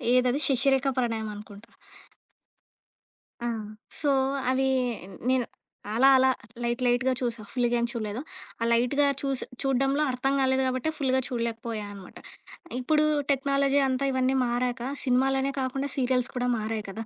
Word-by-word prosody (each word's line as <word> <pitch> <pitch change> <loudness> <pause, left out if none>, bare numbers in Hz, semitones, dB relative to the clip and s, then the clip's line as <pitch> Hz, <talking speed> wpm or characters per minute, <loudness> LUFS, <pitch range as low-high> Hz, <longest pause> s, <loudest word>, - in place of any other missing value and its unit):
ఏదది? 255 +2 +3
'శశిరేఖ 270 0 +2
ప్రణయమనుకుంటా.' 215 -3 -4 1.8
ఆ! - - -1 0.5
సో 290 - +1 0.4
అవి 265 +1 +2 0.6
నేను 255 -2 +2 0.5
అలా 265 +3 +6
అలా 260 0 +4 0.3
లైట్ 240 +2 -1
లైట్‌గా 245 +2 +2
చూశా. 235 -3 -2
ఫుల్‌గా 240 -1 +1
ఏం 235 - +1
చూడలేదు. 220 0 -4 0.4
ఆ - - +2
లైట్‌గా 250 +5 +3
చూసి 275 -2 -2 0.2
చూడడంలో 270 +2 +1
అర్థం 260 +2 0
కాలేదు 265 0 +2
కాబట్టే 255 +4 -1
ఫుల్‌గా 260 -2 +1
చూడలేకపోయానమాట. 225 -5 -5 0.6
ఇప్పుడు 300 +4 +2 0.3
టెక్నాలజీ 275 0 +2
అంతా 260 +1 0
ఇవన్నీ 260 0 +1
మారాక 245 0 -1 0.2
సినిమాలనే 270 +1 +2
కాకుండా 270 +2 -2
సీరియల్స్ 255 -1 +1
కూడా 250 0 0
మారాయి 215 0 -3
కదా! 220 +3 -5
255 Hz, 125 wpm, -27 LUFS, 235-270 Hz, 1.8 s, అలా